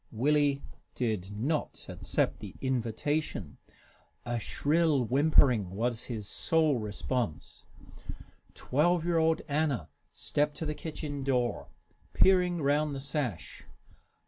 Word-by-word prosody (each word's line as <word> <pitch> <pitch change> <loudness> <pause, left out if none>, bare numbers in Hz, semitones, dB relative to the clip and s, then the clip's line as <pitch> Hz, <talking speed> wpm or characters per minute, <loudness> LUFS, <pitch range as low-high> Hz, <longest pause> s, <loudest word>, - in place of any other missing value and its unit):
Willie 140 +3 +2 0.3
did 110 -7 -1
not 145 +8 -2
accept - - -1
the - - -9
invitation. 130 - -2 0.7
A 120 0 -1
shrill 150 +3 +2
whimpering 130 - +4
was 120 +2 -1
his 110 -5 -3
sole 155 -2 +2
response. 105 - -3 0.9
Twelve 165 +5 +1
year 170 -1 +2
old 160 0 +2
Anna 140 - 0 0.2
stepped 150 0 -1
to 160 - -3
the 150 - -1
kitchen 150 -3 -5
door, 125 -3 0 0.5
peering 180 -3 +4
round 145 +1 +1
the - - -4
sash. 135 - -3
140 Hz, 110 wpm, -30 LUFS, 120-155 Hz, 0.9 s, whimpering